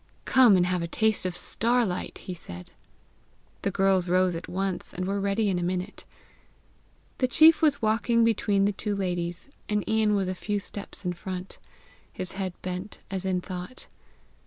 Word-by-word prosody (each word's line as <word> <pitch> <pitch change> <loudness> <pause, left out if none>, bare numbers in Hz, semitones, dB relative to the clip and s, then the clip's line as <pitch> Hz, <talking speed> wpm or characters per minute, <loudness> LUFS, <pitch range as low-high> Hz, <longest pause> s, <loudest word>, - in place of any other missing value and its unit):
"Come 245 -7 +6
and 175 - +3
have 180 -1 0
a 170 - -2
taste 220 +1 +1
of 180 - -4
star 235 +6 +1
light!" 180 -2 -4
he 185 - -4
said. 90 - -9 0.9
The - - 0
girls 195 -2 +2
rose 185 0 +3
at 165 0 -6
once, 190 -1 -3
and 185 - -2
were 200 +1 -1
ready 200 +2 +1
in 185 -3 +1
a - - -3
minute. 180 +3 -3 1.1
The 255 - +3
chief 315 +6 +6
was 295 -6 +2
walking 230 +2 +3
between 205 -3 +2
the 205 - +2
two 205 +1 -3
ladies, 175 +1 -3 0.2
and 210 -1 0
Ian 220 -1 +2
was 195 -2 0
a 185 - -1
few 205 +2 -2
steps 200 0 -8
in 180 - 0
front, 185 +1 -6 0.5
his 185 - -3
head 190 -2 -4
bent 185 +3 -5
as 190 -1 -3
in 185 -1 0
thought. 180 +6 -7
195 Hz, 180 wpm, -27 LUFS, 180-210 Hz, 1.1 s, Come